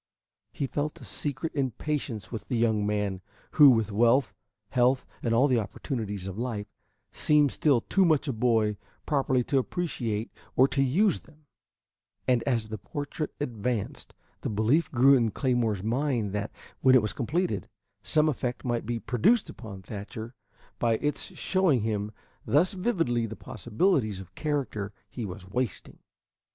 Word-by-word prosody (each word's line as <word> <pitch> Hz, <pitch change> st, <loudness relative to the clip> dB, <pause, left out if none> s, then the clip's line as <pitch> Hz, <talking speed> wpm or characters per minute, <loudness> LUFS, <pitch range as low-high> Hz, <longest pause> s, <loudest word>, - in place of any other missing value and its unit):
He 140 Hz, -, -2 dB
felt 145 Hz, +3 st, -3 dB
a -, -, -12 dB
secret 145 Hz, +2 st, -4 dB
impatience 135 Hz, -4 st, -2 dB
with 115 Hz, -, -6 dB
the 125 Hz, -, -1 dB
young 110 Hz, -3 st, +2 dB
man, 105 Hz, -2 st, -1 dB, 0.3 s
who, 150 Hz, -2 st, +8 dB
with 115 Hz, -4 st, +3 dB
wealth, 115 Hz, +1 st, +3 dB, 0.4 s
health, 125 Hz, +1 st, +2 dB, 0.2 s
and 115 Hz, -, -1 dB
all 120 Hz, +5 st, +4 dB
the 125 Hz, -4 st, +3 dB
opportunities 105 Hz, -3 st, -4 dB
of 95 Hz, +2 st, -6 dB
life, 115 Hz, -4 st, -3 dB, 0.5 s
seemed 150 Hz, -2 st, +3 dB
still 140 Hz, -6 st, +3 dB
too 195 Hz, -, +2 dB
much 155 Hz, -4 st, +3 dB
a 135 Hz, -, 0 dB
boy 110 Hz, -3 st, +2 dB, 0.3 s
properly 135 Hz, -4 st, +1 dB
to 135 Hz, +2 st, +2 dB
appreciate 120 Hz, -, -2 dB, 0.2 s
or 130 Hz, -, +6 dB
to 135 Hz, -, +1 dB
use 175 Hz, +10 st, +3 dB
them; 155 Hz, -1 st, -22 dB, 0.8 s
and 125 Hz, -2 st, +3 dB
as 115 Hz, -5 st, 0 dB
the 110 Hz, -1 st, -5 dB
portrait 145 Hz, -, -4 dB
advanced, 120 Hz, -4 st, -3 dB, 0.3 s
the -, -, -2 dB
belief 110 Hz, +10 st, +2 dB
grew 135 Hz, +2 st, +6 dB
in 120 Hz, -4 st, +4 dB
Claymore's 115 Hz, -4 st, 0 dB
mind 120 Hz, -3 st, 0 dB
that, 105 Hz, +1 st, -2 dB, 0.3 s
when 130 Hz, 0 st, +6 dB
it 130 Hz, -, +7 dB
was 105 Hz, -, -2 dB
completed, 130 Hz, -, -1 dB, 0.3 s
some 155 Hz, 0 st, +3 dB
effect 125 Hz, -3 st, -2 dB
might 120 Hz, -3 st, -1 dB
be 120 Hz, -1 st, -1 dB
produced 130 Hz, -, +2 dB
upon 100 Hz, -5 st, -10 dB
Thatcher 105 Hz, +4 st, -7 dB, 0.5 s
by 115 Hz, -1 st, +2 dB
its 150 Hz, +3 st, -3 dB
showing 185 Hz, -, +2 dB
him 105 Hz, -1 st, -2 dB, 0.3 s
thus 170 Hz, +9 st, +3 dB
vividly 165 Hz, -, 0 dB
the 110 Hz, -, -7 dB
possibilities 120 Hz, -, 0 dB
of 95 Hz, -1 st, -11 dB
character 125 Hz, -8 st, -2 dB, 0.2 s
he 120 Hz, -, -4 dB
was 95 Hz, -1 st, -8 dB
wasting. 120 Hz, +1 st, -3 dB
120 Hz, 155 wpm, -28 LUFS, 110-145 Hz, 0.8 s, who